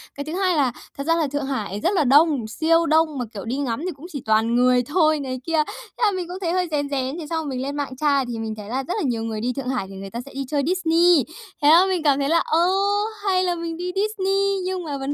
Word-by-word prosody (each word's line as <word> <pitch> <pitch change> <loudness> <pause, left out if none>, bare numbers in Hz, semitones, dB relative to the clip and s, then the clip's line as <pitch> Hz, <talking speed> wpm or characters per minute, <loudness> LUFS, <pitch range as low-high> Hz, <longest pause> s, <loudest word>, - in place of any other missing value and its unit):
Cái 285 - -4
thứ 310 - -5
hai 370 -1 +1
là 275 -5 +2 0.3
thật 280 - -3
ra 330 - +4
là 325 -3 +1
Thượng 285 0 -3
Hải 215 -7 -3
rất 360 - +2
là 325 - +3
đông, 285 -3 +4
siêu 330 +8 +2
đông, 315 -2 +2
mà, 250 - -2
kiểu, 200 -3 -7
đi 240 +4 -2
ngắm 255 -3 -2
thì 370 - -2
cũng 285 +4 -12
chỉ 285 -5 -5
toàn 220 +2 +2
người 250 0 +4
thôi." 310 +2 +2
Này 260 -2 -4
kia, 325 -2 +2
thế - - -8
là 415 - +3
mình 370 -3 -4
cũng 360 +1 -6
thấy 340 -3 -1
hơi 365 0 0
rén 285 -2 -1
rén, 270 +1 -2
thế 310 - -7
xong 330 - -1
rồi - - -4
mình 255 -2 -3
lên 275 +2 -3
mạng 280 -3 -4
tra 280 -1 +2
thì 240 -2 -5
mình 220 -1 -3
thấy 210 -1 -9
là 260 +3 -2
rất 350 - -3
là 420 - -1
nhiều 235 -4 -1
người 220 -1 -4
đi 250 +2 -1
Thượng 255 0 -4
Hải 245 -7 -2
thì 195 - -10
người 195 0 -7
ta 235 - -6
sẽ 275 - -12
đi 275 +1 -4
chơi 285 -2 0
Disney. 340 -4 +3 0.4
Thế 290 - +6
là 340 +4 +7
mình 370 -4 -1
cảm 285 -2 +3
thấy 280 0 0
là, 335 +1 +4
ơ, 335 +3 +2 0.6
hay 370 -2 +2
là 355 -1 0
mình 335 -1 -5
đi 360 +1 -3
Disney, 395 -1 0
nhưng 370 -1 -2
mà 290 -4 -4
vấn 270 +1 -3
290 Hz, 295 wpm, -22 LUFS, 255-340 Hz, 0.6 s, là